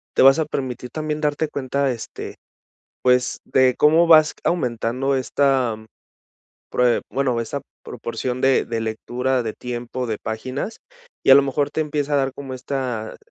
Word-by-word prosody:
te - - +4
vas 135 +3 +7
a 160 - +1
permitir 130 -4 -4
también 155 0 -3
darte 150 +1 0
cuenta, 140 0 -1
este, 120 -2 -7 0.7
pues 125 0 +2
de 130 -1 +3
cómo 160 +3 +5
vas 155 -2 +6
aumentando 130 -3 0
esta 130 -3 +1 0.9
prue 125 -1 +2
bueno, 130 -3 0
esta 135 +4 -4 0.2
proporción 125 +2 -4
de 135 0 +3
de 115 -1 -3
lectura, 125 +3 -1
de 110 -1 -3
tiempo, 125 0 -5
de 110 - -2
páginas, 130 - -4 0.4
y - - +6
a 135 - +11
lo 140 - +7
mejor 140 +1 0
te - - -3
empieza 150 -1 -2
a - - +4
dar 135 -1 0
como 135 -2 -7
esta 130 -3 -4
130 Hz, 160 wpm, -22 LUFS, 125-140 Hz, 0.9 s, a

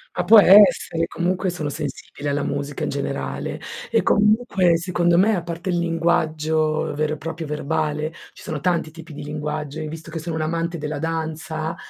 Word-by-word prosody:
Ma 180 - -1
può 220 +3 +9
essere 190 -4 +6
comunque 180 +2 -1
sono 155 -4 -3
sensibile 145 0 -5
alla 140 0 0
musica 140 0 -3
in - - -1
generale. - - -4 0.3
E - - +2
comunque, 210 -5 +3
secondo 175 0 +1
me, 215 +4 +4
a 175 - -1
parte 170 +2 -5
il 175 - +1
linguaggio, 160 -2 0
vero 155 +1 -1
e - - -5
proprio, 165 0 -6
verbale, 150 +1 -2 0.2
ci - - -14
sono 155 - -4
tanti 170 -1 0
tipi 165 0 -12
di 145 - -7
linguaggio 150 0 -4
e 155 - -4
visto 160 +1 -8
che 165 - -4
sono 160 0 -4
un'amante 165 +2 -2
della 150 -1 -4
danza, 160 0 -3
160 Hz, 175 wpm, -22 LUFS, 155-175 Hz, 0.3 s, può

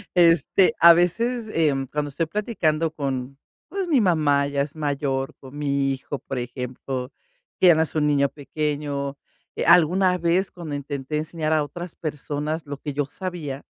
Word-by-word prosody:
Este, 175 - +4
a 170 0 +10
veces, 225 +7 +1
em, 140 -5 +1
cuando 150 +2 -3
estoy 155 +4 -1
platicando 165 -5 0
con, 135 -3 -4 0.3
pues, 385 -2 -3
mi 285 -7 +3
mamá 150 -7 +3
ya 140 0 -1
es 145 +1 -9
mayor, 140 -3 -2
con 135 +1 -12
mi 140 -2 0
hijo, 135 +2 -5
por 135 -1 -5
ejemplo, 125 +1 -5 0.5
que 185 - +6
ya 170 - +8
no 160 - +3
es 155 - -5
un 150 -1 +2
niño 140 -1 +3
pequeño. 145 -1 -3 0.4
Eh, - - -2
alguna 180 +2 +5
vez 175 +3 +1
cuando 165 -4 -7
intenté 140 +1 -4
enseñar 155 0 -2
a 155 - +3
otras 170 +4 -8
personas 150 +1 -4
lo 145 -1 -6
que 145 +1 -5
yo 145 +1 0
sabía 150 -3 -6
150 Hz, 170 wpm, -24 LUFS, 140-170 Hz, 0.5 s, a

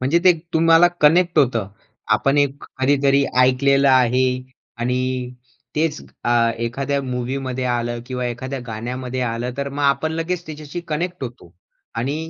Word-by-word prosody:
म्हणजे 135 +7 +2
ते 185 - +8 0.2
तुम्हाला 165 +1 +6
कनेक्ट 170 +3 +4
होतं. 120 -8 +2 0.5
आपण 135 +5 +1
एक 145 0 0 0.2
कधीतरी 140 0 +3 0.2
ऐकलेलं 135 +2 +4
आहे 130 0 +4 0.5
आणि 125 +1 0 0.8
तेच 155 -1 0 0.2
अ, 120 -1 +3
एखाद्या 140 +4 -1
मूव्हीमध्ये 130 0 -3
आलं 120 0 -2
किंवा 125 -1 -3
एखाद्या 130 +3 -4
गाण्यामध्ये 125 +3 -4
आलं, 120 0 -2
तर 140 0 -2
मग 145 +1 -4
आपण 145 +3 +2
लगेच 165 +2 -3
त्याच्याशी 155 +2 -7
कनेक्ट 175 +2 -3
होतो 120 -8 -10 0.4
आणि 135 +6 -1
135 Hz, 135 wpm, -21 LUFS, 125-150 Hz, 0.8 s, ते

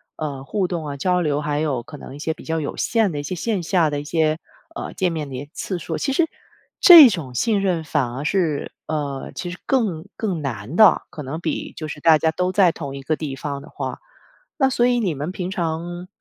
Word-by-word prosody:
呃， 140 -4 -5
互 190 +5 -1
动 165 -4 -4
啊、 140 -1 -5
交 180 +4 +1
流， 145 -3 0
还 150 -1 -1
有 140 -6 -1
可 150 +4 -10
能 135 - -10
一 - - -10
些 160 +2 -1
比 - - -14
较 160 0 -1
有 145 - -4
限 225 -5 +1
的 145 - -4
一 145 - -4
些 180 +5 -4
线 205 +1 -1
下 165 -3 +2
的 145 - -2
一 - - -8
些， 155 0 +1 0.3
呃， 340 - -5
见 185 -3 +1
面 150 -3 -4
的 130 - -6
一 - - -3
些 145 - -27
次 185 - -3
数， 160 -1 -4
其 275 - 0
实， 330 +4 +3 0.6
这 330 -8 +11
种 140 - -5
信 215 - +1
任 180 -4 0
反 130 -5 0
而 135 +4 -5
是 160 -4 0 0.2
呃， 145 -3 -3
其 175 - -4
实 185 - -9
更 205 -12 0
更 190 -8 -2
难 125 0 -5
的， 215 +2 +6
可 155 - -7
能 145 +3 -5
比 - - -3
就 155 - -4
是 150 - -7
大 160 0 +6
家 160 +1 +1
都 180 +3 -1
在 185 -2 +4
同 140 -4 -6
一 135 - -9
个 155 - 0
地 145 -4 -5
方 140 0 -5
的 - - -13
话。 - - -5 0.6
那 270 -3 +4
所 240 0 +3
以 245 -1 +2
你 190 -7 0
们 145 +5 -4
平 185 -1 -4
常 175 +1 -3
160 Hz, 265 characters per minute, -22 LUFS, 145-185 Hz, 0.6 s, 这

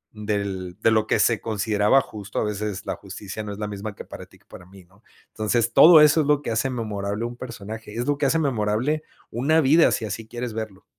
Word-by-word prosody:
del 100 -4 -4
de 115 - +4
lo 110 -1 +2
que - - +2
se 115 -2 +2
consideraba 105 +2 +2
justo 105 -4 -7
a - - 0
veces 105 -1 -4
la - - -3
justicia 105 +1 -8
no 105 - -6
es 100 - -7
la 105 - -3
misma 105 0 -6
que - - -10
para - - -10
ti - - -21
que - - -33
para 90 - -13
mí, 95 0 -16
¿no?, 95 +5 -27 0.3
entonces 115 +2 -1
todo 160 +3 +8
eso 150 +1 +5
es 145 - -2
lo 145 -1 +3
que - - -3
hace 110 +4 0
memorable 105 -3 -3
un 120 +1 -6
personaje, 110 -3 -8
es 120 +1 -2
lo 145 -1 +1
que 145 - +2
hace 155 - +2
memorable 125 +2 0 0.3
una 140 +8 +2
vida 155 +4 +5
si 110 - -1
así 110 +2 -6
quieres 120 0 -5
verlo. 110 -3 -7
110 Hz, 235 wpm, -23 LUFS, 105-125 Hz, 0.3 s, todo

